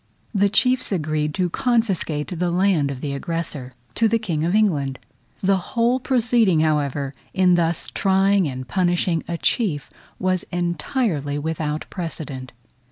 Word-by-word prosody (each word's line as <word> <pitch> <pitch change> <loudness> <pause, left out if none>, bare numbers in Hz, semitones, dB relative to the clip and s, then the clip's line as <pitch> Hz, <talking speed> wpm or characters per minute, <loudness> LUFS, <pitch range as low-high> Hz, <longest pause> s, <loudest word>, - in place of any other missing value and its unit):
The 200 -1 +3
chiefs 250 +4 +3
agreed 155 -4 0
to 185 -2 +1
confiscate 190 -10 0
the 180 0 +1
land 175 -5 +2
of 135 -2 -5
the 145 -2 -3
aggressor 150 -3 -4 0.2
to 225 - +3
the 230 +1 +2
King 170 -9 -2
of 175 +4 +1
England. 145 -11 +2 0.5
The 195 0 +4
whole 235 +7 +1
proceeding, 235 -9 +3
however, 145 -3 0 0.2
in 185 -1 +4
thus 170 -1 +1
trying 195 -1 +3
and 130 -1 -5
punishing 175 -2 +1
a 170 - -2
chief 165 - 0 0.3
was 185 -1 0
entirely 175 - -1
without 155 0 -2
precedent. 145 -8 -5
175 Hz, 140 wpm, -22 LUFS, 150-195 Hz, 0.5 s, The